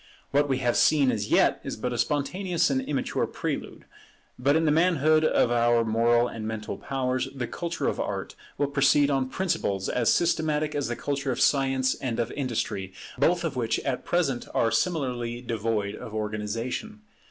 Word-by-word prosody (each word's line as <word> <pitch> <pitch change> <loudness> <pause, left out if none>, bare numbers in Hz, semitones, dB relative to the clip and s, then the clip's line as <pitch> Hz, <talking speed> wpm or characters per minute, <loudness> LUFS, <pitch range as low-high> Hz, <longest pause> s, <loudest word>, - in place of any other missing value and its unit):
What 145 +1 +2
we 135 - +1
have 120 - +2
seen 140 -4 +4
as 105 0 -3
yet - - +3
is - - -5
but 125 - -3
a - - -3
spontaneous 170 +3 0
and 130 -1 +1
immature 135 +1 -1
prelude; - - -5 0.5
but 140 +3 +3
in 160 0 +2
the 150 - +3
manhood 155 -1 +3
of 125 -5 +3
our 120 -1 +3
moral 120 +2 +3
and 110 -2 -6
mental 110 -1 -4
powers, 130 -1 -1
the 125 -2 -2
culture 170 +8 -3
of - - -1
Art - - -3 0.2
will 145 - +2
proceed 140 +1 +3
on 135 -2 0
principles 115 - -1
as 120 -2 +2
systematic 155 -3 +1
as 145 -2 -1
the 120 - -2
culture 140 +2 -2
of - - -3
Science 135 -2 +2
and 120 -4 -4
of 120 - -1
Industry, 110 -8 -3 0.3
both 175 0 +3
of 165 -4 -2
which 115 -3 0
at 135 -2 -2
present 145 -8 0
are 115 - +2
similarly 120 -4 -1
devoid 110 -4 -2
of 110 - -8
organization. 110 - -4
130 Hz, 175 wpm, -26 LUFS, 115-150 Hz, 0.5 s, seen